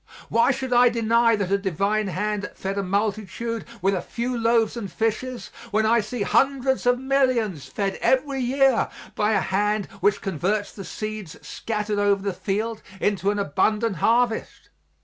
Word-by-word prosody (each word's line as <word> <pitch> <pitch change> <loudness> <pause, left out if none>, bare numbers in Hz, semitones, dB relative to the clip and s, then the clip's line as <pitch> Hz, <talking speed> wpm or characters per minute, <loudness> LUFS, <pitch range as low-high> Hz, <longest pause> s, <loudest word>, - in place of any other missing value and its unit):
Why 230 +3 +3
should 260 -2 -1
I 245 0 +6
deny 230 0 +3
that 200 -3 -2
a 200 - +3
divine 200 +3 0
hand 205 +3 -2
fed 195 +1 -4
a - - +1
multitude 210 +2 -2 0.2
with 195 +1 +3
a 185 - -1
few 240 +6 -3
loaves 230 -1 +2
and 205 -6 -5
fishes 230 +4 -2 0.2
when 220 +1 +1
I 230 +2 +4
see 215 +1 -3
hundreds 265 +1 +1
of 245 0 +4
millions 255 - 0
fed 200 -2 -3
every 270 +1 +1
year 260 0 +2 0.2
by 210 +1 +1
a - - +2
hand 205 +1 0
which 205 +2 +2
converts 195 +4 -1
the 195 - -9
seeds 215 -3 -6
scattered 210 -2 -2
over 200 -1 +2
the 200 -2 -1
field 215 +4 -2 0.2
into 200 -1 +1
an 205 - 0
abundant 210 +3 +1
harvest? 235 +5 0
215 Hz, 165 wpm, -24 LUFS, 200-235 Hz, 0.2 s, I